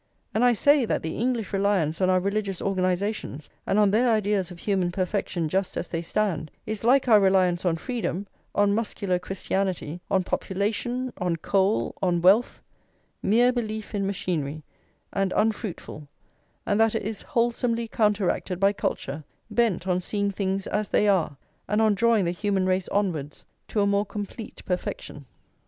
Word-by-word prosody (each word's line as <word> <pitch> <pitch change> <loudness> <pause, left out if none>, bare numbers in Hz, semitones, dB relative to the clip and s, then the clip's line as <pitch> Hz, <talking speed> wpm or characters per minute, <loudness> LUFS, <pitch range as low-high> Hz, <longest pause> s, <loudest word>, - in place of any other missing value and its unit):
And 220 - +2
I 245 -1 +6
say 285 +4 +4
that - - -1
the 160 - -3
English 235 -3 -1
reliance 195 -5 +1
on 185 - +3
our 185 0 +4
religious 200 0 -2
organisations 185 -4 -2 0.2
and 195 - +2
on 205 -2 +5
their 240 +4 +3
ideas 205 -4 +1
of 180 - -10
human 185 -2 0
perfection 185 -2 -1
just 190 +4 -1
as - - -3
they 165 - -2
stand, 170 -4 -1 0.2
is 215 -1 -4
like 260 +3 +4
our 220 -3 +7
reliance 185 -2 +3
on 170 -2 +2
freedom, 210 -2 -3 0.3
on 205 0 +3
muscular 200 -4 -1
Christianity, 185 -3 -2
on 190 -2 +2
population, 225 +8 -2
on 180 -2 0
coal, 195 +5 +1
on 180 -2 +2
wealth, 195 +8 +3 0.6
mere 240 +5 +4
belief 220 -3 -4
in 200 -1 0
machinery, 155 -6 -2 0.5
and 195 -1 0
unfruitful; 210 -8 -2 0.6
and 205 0 +1
that 225 0 +3
it - - -1
is 215 0 -4
wholesomely 235 -2 0
counteracted 205 -5 0
by 200 +1 +4
culture, 145 -6 -3 0.3
bent 210 -5 +1
on 180 0 +1
seeing 200 +2 -1
things 195 0 -2
as 210 0 -1
they 210 - +2
are, 180 -8 +2 0.3
and 210 +2 +1
on 220 -1 +4
drawing 220 -1 +3
the 170 - +1
human 195 +1 0
race 185 0 0
onwards 165 -8 -2 0.2
to 210 - 0
a - - +3
more 200 0 +1
complete 210 +2 -7
perfection. 150 -5 -4
200 Hz, 165 wpm, -26 LUFS, 180-215 Hz, 0.6 s, our